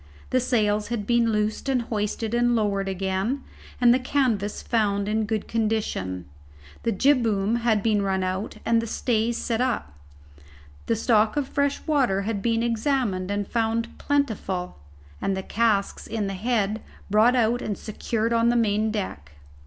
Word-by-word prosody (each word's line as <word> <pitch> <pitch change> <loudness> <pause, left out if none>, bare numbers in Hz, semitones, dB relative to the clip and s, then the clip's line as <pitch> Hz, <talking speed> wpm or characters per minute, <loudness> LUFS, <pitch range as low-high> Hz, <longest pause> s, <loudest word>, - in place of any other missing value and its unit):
The 255 - +3
sails 215 -4 +1
had 230 -3 -3
been 235 0 +3
loosed 210 +5 -1
and 255 -3 +1
hoisted 215 0 -2
and 240 0 +3
lowered 200 -3 0
again, 195 +7 -1 0.4
and 240 -1 +6
the 255 - +2
canvas 250 -6 0
found 205 -3 +1
in 215 +1 0
good 215 -1 -2
condition. 210 - -1 0.6
The 230 - 0
jibboom 225 -3 +2
had 225 -4 +1
been 215 -2 +2
run 190 -1 0
out, 185 +3 -3
and 230 0 +3
the 230 - -5
stays 230 0 0
set 230 0 -1
up. 245 - -1 0.9
The 230 - +2
stock 220 +1 +2
of 285 -2 0
fresh 285 0 -1
water 255 -11 +2
had 205 -1 -2
been 230 +1 +1
examined 230 -5 0
and 205 -1 -1
found 230 0 -1
plentiful, 205 - -1 0.4
and 195 -1 0
the 190 - -3
casks 215 -3 0
in 220 -2 -2
the 195 - -3
head 215 +1 0 0.3
brought 220 +4 +5
out 240 0 +2
and 205 - -3
secured 225 +1 -2
on 230 0 +3
the 240 - +2
main 215 -2 +2
deck. 130 - -5
220 Hz, 160 wpm, -25 LUFS, 200-235 Hz, 0.9 s, and